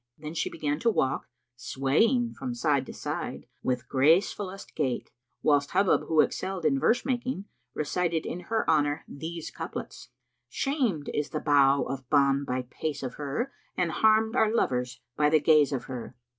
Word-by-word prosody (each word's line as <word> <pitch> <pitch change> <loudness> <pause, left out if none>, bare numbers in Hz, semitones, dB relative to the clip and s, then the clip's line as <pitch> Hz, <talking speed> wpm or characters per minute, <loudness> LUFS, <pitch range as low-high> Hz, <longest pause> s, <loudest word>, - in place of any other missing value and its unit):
Then 150 +1 -7
she 170 - -1
began 150 0 -2
to 235 - +2
walk, 135 -11 0 0.3
swaying 190 - +1
from 250 -2 -5
side 145 - +1
to - - -7
side - - -5 0.2
with 125 -1 -2
gracefullest 185 +8 +1
gait, 130 -6 -2 0.3
whilst 145 -1 +2
Hubub 190 0 +3
who 160 -2 +5
excelled 185 -3 -2
in 135 -3 +3
verse 240 - +2
making, 250 -5 -2 0.3
recited 165 +1 -1
in 175 - -4
her 225 -1 0
honour 150 -1 +2
these 160 +3 -6
couplets, - - -7 0.4
"Shamed 250 - -1
is 150 - -1
the 155 - -3
bough 140 -2 +4
of 135 -2 -6
Bán 140 -1 +3
by 125 0 -1
pace 145 +3 -5
of 125 -2 -4
her; 190 - -2
* - - -39
And 175 -2 +1
harmed 220 +4 +3
are 220 -3 +3
lovers 125 - 0
by 150 0 +3
the 155 0 +4
gaze 150 -2 +4
of 135 - -2
her. 125 -3 -7
155 Hz, 170 wpm, -28 LUFS, 140-195 Hz, 0.4 s, who